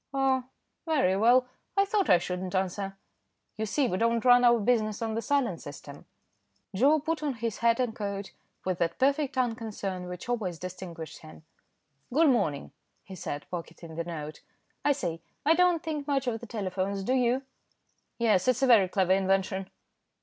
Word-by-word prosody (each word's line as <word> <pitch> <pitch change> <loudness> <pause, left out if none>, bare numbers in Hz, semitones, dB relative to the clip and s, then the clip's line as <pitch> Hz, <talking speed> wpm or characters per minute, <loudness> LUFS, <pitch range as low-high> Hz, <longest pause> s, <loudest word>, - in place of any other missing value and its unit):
"Oh! 265 -2 +2 0.4
very 265 - +2
well. 240 +5 +5 0.3
I 395 - +5
thought 400 -1 0
I 180 - +8
shouldn't 180 +1 -4
answer." 195 +1 -2 0.6
"You 220 0 -3
see, 265 +6 +1
we 185 -4 -1
don't 230 +1 +1
run 245 0 +7
our 240 -1 +6
business 215 -1 +1
on 225 -1 -2
the 225 - -1
silent 250 -10 0
system." 145 0 -10 0.7
Joe 285 +9 +4
put 320 +2 -2
on 290 -4 -1
his 230 -2 -3
hat 230 0 +3
and 245 -3 0
coat, 200 -1 -4 0.3
with 185 -2 -1
that 170 -1 0
perfect 275 0 +1
unconcern 215 -7 -2
which 180 +3 -7
always 210 -8 -2
distinguished 180 -3 -8
him. 155 0 -14 0.7
"Good 310 +4 +4
morning," 200 - 0 0.3
he 195 - -11
said, 145 -5 -5
pocketing 170 -1 -7
the 170 - -2
note. 155 -3 -7 0.4
"I 290 - +4
say, 170 - -4 0.2
I 315 - +6
don't 355 -1 +3
think 305 -3 -4
much 275 -2 +1
of 225 -3 -2
telephones, 195 -2 -2
do 255 - 0
you?" 255 +1 +2 0.7
"Yes, 220 -5 +2
it's 255 +1 +2
a - - +7
very 225 -7 +6
clever 185 -1 +2
invention." 190 0 0
215 Hz, 170 wpm, -28 LUFS, 185-255 Hz, 0.7 s, I